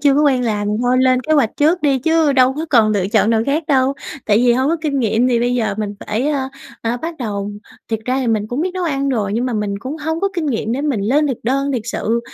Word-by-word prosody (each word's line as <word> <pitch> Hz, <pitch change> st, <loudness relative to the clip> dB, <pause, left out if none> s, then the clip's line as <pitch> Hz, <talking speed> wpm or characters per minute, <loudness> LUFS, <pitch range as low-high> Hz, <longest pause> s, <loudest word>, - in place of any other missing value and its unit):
chưa 280 Hz, -1 st, +5 dB
có 295 Hz, -, +3 dB
quen 270 Hz, -4 st, +3 dB
làm 210 Hz, -2 st, -1 dB
thôi 250 Hz, +1 st, +2 dB
lên 255 Hz, -1 st, +3 dB
kế 310 Hz, -, -1 dB
hoạch 280 Hz, -8 st, +3 dB
trước 320 Hz, +5 st, +2 dB
đi, 280 Hz, -3 st, +2 dB
chứ 320 Hz, +2 st, +2 dB
đâu 260 Hz, -1 st, +4 dB
có 315 Hz, +3 st, -4 dB
còn 225 Hz, -5 st, +4 dB
lựa 195 Hz, -3 st, 0 dB
chọn 220 Hz, 0 st, +3 dB
nào 225 Hz, -1 st, +2 dB
khác 295 Hz, +4 st, +1 dB
đâu, 270 Hz, -3 st, +2 dB, 0.3 s
tại 205 Hz, -, +3 dB
vì 240 Hz, +2 st, +4 dB
hông 260 Hz, +4 st, +1 dB
có 335 Hz, -, +1 dB
kinh 290 Hz, -3 st, -1 dB
nghiệm 230 Hz, +1 st, +2 dB
thì 240 Hz, -2 st, +2 dB
bây 245 Hz, +1 st, +1 dB
giờ 220 Hz, -5 st, 0 dB
mình 205 Hz, -1 st, -3 dB
phải, 230 Hz, +7 st, -1 dB
ờ, 275 Hz, -3 st, -1 dB, 0.3 s
ờ, 230 Hz, +1 st, -1 dB
bắt 330 Hz, +7 st, -5 dB
đầu. 205 Hz, -4 st, -3 dB, 0.4 s
Thiệt 225 Hz, -, 0 dB
ra 255 Hz, +2 st, 0 dB
thì 260 Hz, -, -2 dB
mình 215 Hz, -2 st, 0 dB
cũng 245 Hz, +5 st, -2 dB
biết 365 Hz, +3 st, 0 dB
nấu 370 Hz, -, -2 dB
ăn 275 Hz, -4 st, -1 dB
rồi, 215 Hz, -7 st, -1 dB
nhưng 235 Hz, +4 st, 0 dB
mà 250 Hz, -, -2 dB
mình 210 Hz, -2 st, -2 dB
cũng 260 Hz, +9 st, -6 dB
hông 320 Hz, +1 st, -3 dB
có 395 Hz, -, +1 dB
kinh 340 Hz, -4 st, -2 dB
nghiệm 225 Hz, -4 st, -1 dB
để 265 Hz, -, -1 dB
mình 285 Hz, -8 st, -1 dB
lên 275 Hz, +9 st, +2 dB
thực 265 Hz, -5 st, -2 dB
đơn 275 Hz, +4 st, 0 dB
thiệt 245 Hz, -4 st, -2 dB
sự, 230 Hz, 0 st, -1 dB
255 Hz, 280 wpm, -18 LUFS, 225-285 Hz, 0.4 s, chưa